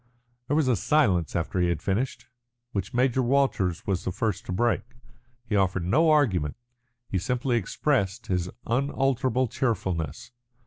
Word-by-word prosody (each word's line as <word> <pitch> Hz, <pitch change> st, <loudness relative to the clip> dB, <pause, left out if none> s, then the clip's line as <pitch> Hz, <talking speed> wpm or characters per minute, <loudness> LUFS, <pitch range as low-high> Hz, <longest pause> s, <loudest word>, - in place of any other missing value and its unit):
There 145 Hz, -, +1 dB
was 155 Hz, -3 st, +2 dB
a 125 Hz, -, +4 dB
silence 95 Hz, -, +2 dB
after 85 Hz, +2 st, -1 dB
he 90 Hz, -1 st, +2 dB
had 85 Hz, -, 0 dB
finished, 110 Hz, +7 st, -1 dB, 0.5 s
which 100 Hz, -1 st, -3 dB
Major 130 Hz, +1 st, +2 dB
Walters 120 Hz, -9 st, +1 dB
was 95 Hz, -3 st, -1 dB
the -, -, -2 dB
first 100 Hz, +1 st, -2 dB
to -, -, -3 dB
break. 120 Hz, +6 st, +1 dB, 0.6 s
He 110 Hz, -, -2 dB
offered 95 Hz, -3 st, +1 dB
no 155 Hz, -, +3 dB
argument 100 Hz, -, +2 dB, 0.5 s
he 95 Hz, -, -1 dB
simply 125 Hz, +4 st, 0 dB
expressed 105 Hz, -2 st, 0 dB
again 90 Hz, -, 0 dB
his 90 Hz, 0 st, -3 dB, 0.2 s
unalterable 130 Hz, 0 st, +1 dB
cheerfulness. 105 Hz, -2 st, -2 dB
115 Hz, 150 wpm, -26 LUFS, 90-130 Hz, 0.6 s, a